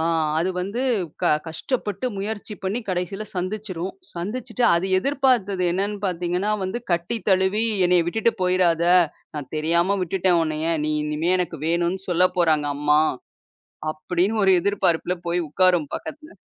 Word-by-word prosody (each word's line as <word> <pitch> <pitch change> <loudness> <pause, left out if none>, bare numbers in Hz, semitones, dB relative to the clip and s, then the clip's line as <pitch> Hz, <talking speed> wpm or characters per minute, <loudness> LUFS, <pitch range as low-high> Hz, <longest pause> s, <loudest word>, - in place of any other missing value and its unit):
ஆ - - 0 0.4
அது 175 +3 0
வந்து 200 +7 -3 0.4
க - - +3 0.2
கஷ்டப்பட்டு 205 +6 -3
முயற்சி 210 +1 -4
பண்ணி 200 +6 -1
கடைசியில 185 +3 -3
சந்திச்சுரும். 185 -1 -4 0.2
சந்திச்சிட்டு 225 +6 -4
அது 170 +3 0
எதிர்பார்த்தது 245 -7 +1
என்னன்னு 200 +3 -1
பாத்தீங்கன்னா 180 +3 -1
வந்து, 190 +6 -3
"கட்டி 175 +7 0
தழுவி 190 +3 +2 0.2
என்னைய 175 -1 +3
விட்டுட்டு 225 +5 +1
போயிராத, 180 -2 +2 0.5
நான் 145 -3 -7
தெரியாம 170 +5 +2
விட்டுட்டேன் 180 -1 +2
உன்னைய, 155 0 -2 0.2
நீ 155 - 0
இனிமே 150 +4 0
எனக்கு 175 -3 -3
வேணும்ன்னு 175 +3 0
சொல்லப் 180 +1 +2
போறாங்க 155 -4 +2
அம்மா." 150 +1 +3 0.9
அப்படின்னு 180 +7 -1
ஒரு 190 - +5
எதிர்பார்ப்பில 180 -3 +1
போய் 175 +1 +1
உட்காரும் 175 -2 +3
பக்கத்துல. 305 +1 -9
180 Hz, 135 wpm, -23 LUFS, 170-200 Hz, 0.9 s, ஒரு